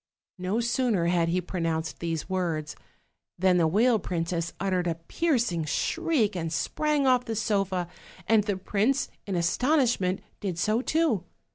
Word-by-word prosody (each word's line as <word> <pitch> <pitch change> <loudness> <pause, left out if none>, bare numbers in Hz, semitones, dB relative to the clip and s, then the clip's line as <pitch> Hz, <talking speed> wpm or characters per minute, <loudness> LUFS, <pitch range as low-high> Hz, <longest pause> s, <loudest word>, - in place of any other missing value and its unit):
No 185 +5 -1
sooner 235 -6 +1
had 170 -1 +2
he 180 +2 +1
pronounced 165 -3 -3
these 165 -2 -3
words 170 -5 -2 0.6
than 185 0 +3
the 165 -2 +4
whale 220 +7 +3
princess 170 -2 -2
uttered 185 -2 0
a 165 - 0
piercing 225 - 0
shriek 235 - 0
and 165 -2 -3
sprang 295 - 0
off 250 -1 +3
the 225 - -3
sofa, 195 -4 0 0.4
and 220 -2 +4
the 205 -3 -1
prince, 215 +8 0 0.2
in 195 - -2
astonishment, 195 - +1 0.2
did 185 -5 -3
so 215 +6 +1
too. 300 - +1
190 Hz, 145 wpm, -27 LUFS, 170-235 Hz, 0.6 s, the